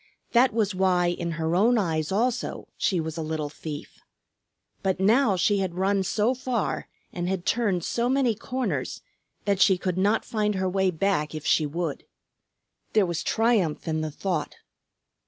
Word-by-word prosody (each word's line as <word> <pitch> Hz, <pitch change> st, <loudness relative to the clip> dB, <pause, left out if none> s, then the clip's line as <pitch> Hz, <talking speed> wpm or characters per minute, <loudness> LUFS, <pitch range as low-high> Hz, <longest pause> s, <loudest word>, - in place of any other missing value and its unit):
That 250 Hz, +2 st, +5 dB
was 210 Hz, -2 st, 0 dB
why 185 Hz, -2 st, +2 dB
in 170 Hz, -1 st, -3 dB
her 165 Hz, 0 st, -1 dB
own 230 Hz, +6 st, +4 dB
eyes 160 Hz, -6 st, 0 dB
also 240 Hz, +5 st, -1 dB
she 185 Hz, -5 st, +1 dB
was 160 Hz, 0 st, -4 dB
a -, -, -2 dB
little 155 Hz, -1 st, -3 dB
thief. 150 Hz, -1 st, -8 dB, 0.8 s
But 190 Hz, -1 st, 0 dB
now 215 Hz, +2 st, +4 dB
she 195 Hz, +3 st, +2 dB
had 185 Hz, -3 st, -2 dB
run 195 Hz, +1 st, +2 dB
so 210 Hz, +5 st, +1 dB
far 255 Hz, -3 st, -2 dB, 0.3 s
and 175 Hz, 0 st, -2 dB
had 190 Hz, -2 st, -2 dB
turned 205 Hz, -7 st, +1 dB
so 235 Hz, +6 st, 0 dB
many 260 Hz, -3 st, +2 dB
corners 250 Hz, +4 st, -3 dB, 0.4 s
that 200 Hz, -2 st, +1 dB
she 190 Hz, -, +6 dB
could 180 Hz, 0 st, -2 dB
not 205 Hz, +4 st, +2 dB
find 210 Hz, -2 st, 0 dB
her 190 Hz, 0 st, 0 dB
way 190 Hz, 0 st, +2 dB
back 165 Hz, -3 st, 0 dB
if 155 Hz, -, -6 dB
she 155 Hz, -, +3 dB
would. 165 Hz, 0 st, -3 dB, 0.9 s
There 215 Hz, -3 st, +4 dB
was 170 Hz, -2 st, -2 dB
triumph 225 Hz, -10 st, +1 dB
in 160 Hz, -1 st, 0 dB
the 155 Hz, -, -2 dB
thought. 155 Hz, 0 st, -3 dB
190 Hz, 170 wpm, -26 LUFS, 170-215 Hz, 0.9 s, she